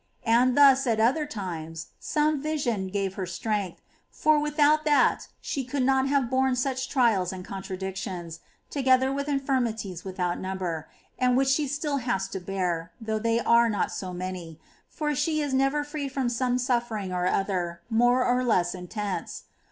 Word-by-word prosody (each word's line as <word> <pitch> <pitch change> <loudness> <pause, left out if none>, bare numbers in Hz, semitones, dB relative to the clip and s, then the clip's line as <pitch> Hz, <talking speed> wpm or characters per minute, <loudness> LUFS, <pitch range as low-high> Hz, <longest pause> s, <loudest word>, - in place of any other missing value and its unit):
And 245 +3 +4
thus, 275 -2 +6
at 225 -2 +1
other 270 +7 +2
times, 165 - -6
some 300 -1 0
vision 260 -10 -1
gave 195 0 -2
her 190 -2 -4
strength, 200 0 -3 0.3
for 305 -1 +3
without 300 +1 +3
that 300 -2 +3
she 275 - -3
could 260 +1 -2
not 265 +1 +3
have 275 -3 +2
borne 260 +1 +2
such 260 +1 -1
great - - -14
trials 225 -9 +2
and 185 -1 -7
contradictions, 190 -3 -5 0.3
together 265 -1 +3
with 280 +1 -3
infirmities 240 - -1
without 180 -2 -2
number, 185 -4 -4 0.3
and 250 -1 +3
which 270 0 +3
she 285 +2 +2
still 290 +1 -1
has 210 -7 -1
to 190 - -4
bear, 180 -3 -2
though 220 -1 -2
they 230 +1 +1
are 235 0 +4
not 210 - -1
so 185 -1 -5
many^ 180 -3 -6 0.2
— - - -36
for 300 -2 0
she 310 +3 0
is 290 -3 -1
never 270 +3 +2
free 295 -1 -4
from 265 -2 -1
some 245 +1 0
suffering 235 -6 -1
or 180 0 0
other, 180 -3 -1
more 245 +2 +3
or 250 +1 +2
less 180 -8 +2
intense. 190 +2 -5
235 Hz, 170 wpm, -27 LUFS, 190-270 Hz, 0.3 s, thus